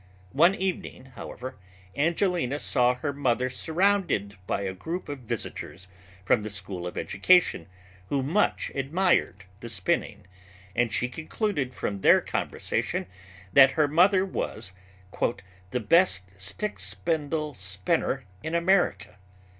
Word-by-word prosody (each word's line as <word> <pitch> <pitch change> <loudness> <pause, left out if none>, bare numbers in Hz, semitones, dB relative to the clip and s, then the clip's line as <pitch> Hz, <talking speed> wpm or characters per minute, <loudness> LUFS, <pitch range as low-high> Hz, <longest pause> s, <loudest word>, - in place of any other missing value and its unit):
One 170 +8 +5
evening, 185 -8 -4
however, 130 -2 -8 0.4
Angelina 165 -2 +1
saw 125 -3 +2
her 140 +3 -3
mother 130 -2 0
surrounded 165 - +1
by 100 - -1
a 95 -1 -3
group 165 - -5
of 145 -2 -5
visitors 95 -5 -5 0.4
from 110 - +3
the 110 - -5
School 95 -3 -5
of 90 - -7
Education 180 - +3 0.4
who 140 -2 0
much 170 +10 +1
admired 140 - +1 0.2
the 120 - -7
spinning, 95 -5 -2 0.5
and 120 -2 +2
she 125 - 0
concluded 155 - -3
from 100 -1 -3
their - - +6
conversation - - -2 0.5
that 135 -1 +8
her 155 -2 +3
mother 185 +5 +4
was 95 - -4 1.0
"the 125 - -1
best 165 - +3
stick 100 - -4
spindle 155 -2 -1
spinner 95 -4 -1 0.2
in 160 +2 -3
America." 170 - +1
140 Hz, 120 wpm, -27 LUFS, 105-170 Hz, 1.0 s, that